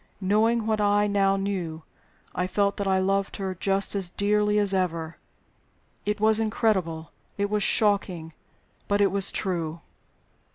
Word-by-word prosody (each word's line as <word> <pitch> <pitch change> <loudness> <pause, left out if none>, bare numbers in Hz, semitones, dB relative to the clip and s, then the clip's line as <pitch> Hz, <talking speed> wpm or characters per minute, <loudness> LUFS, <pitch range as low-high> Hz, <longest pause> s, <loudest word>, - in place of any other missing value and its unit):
Knowing 215 +4 +2
what 220 -1 0
I 205 0 +3
now 200 -1 +2
knew, 185 -5 -3 0.5
I 180 +1 -1
felt 200 +1 0
that 200 - -2
I 190 0 +3
loved 195 +1 0
her 190 -1 -3
just 195 +2 0
as 195 -3 -2
dearly 210 +2 +1
as 205 -2 +2
ever. 165 -3 -2 0.9
It 210 0 0
was 220 +1 +4
incredible, 190 -8 -1 0.3
it 200 0 -1
was 210 0 +1
shocking; 195 -7 +1 0.5
but 205 0 +1
it 200 -2 +3
was 200 0 +1
true. 170 -4 -2
200 Hz, 150 wpm, -26 LUFS, 185-210 Hz, 0.9 s, was